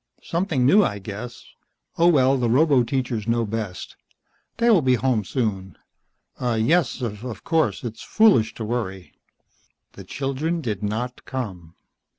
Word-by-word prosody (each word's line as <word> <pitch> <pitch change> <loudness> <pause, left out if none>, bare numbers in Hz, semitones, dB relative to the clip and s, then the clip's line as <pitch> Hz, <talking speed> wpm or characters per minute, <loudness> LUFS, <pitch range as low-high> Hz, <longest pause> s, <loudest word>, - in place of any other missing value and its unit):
"Something 165 -7 0
new, 200 +10 +6
I 100 - -1
guess. 110 +5 -8 0.5
Oh, 170 - +4
well, 135 -5 +4
the 125 -3 0
roboteachers 125 -4 +2
know 115 0 +1
best. 105 -4 -5 0.6
They 235 +1 +1
will 195 -7 +5
be 130 -2 +3
home 120 -3 0
soon." 95 - -3 0.6
"Yes, 125 +7 +1
of 115 +1 -5
course. 160 -3 0
It's 115 -2 -6
foolish 190 - +3
to 110 - -5
worry." 100 -5 -4 0.8
The - - -11
children 145 +5 -2
did 110 - -3
not 110 +4 -3
come. 95 -11 -6
120 Hz, 135 wpm, -23 LUFS, 110-140 Hz, 0.8 s, new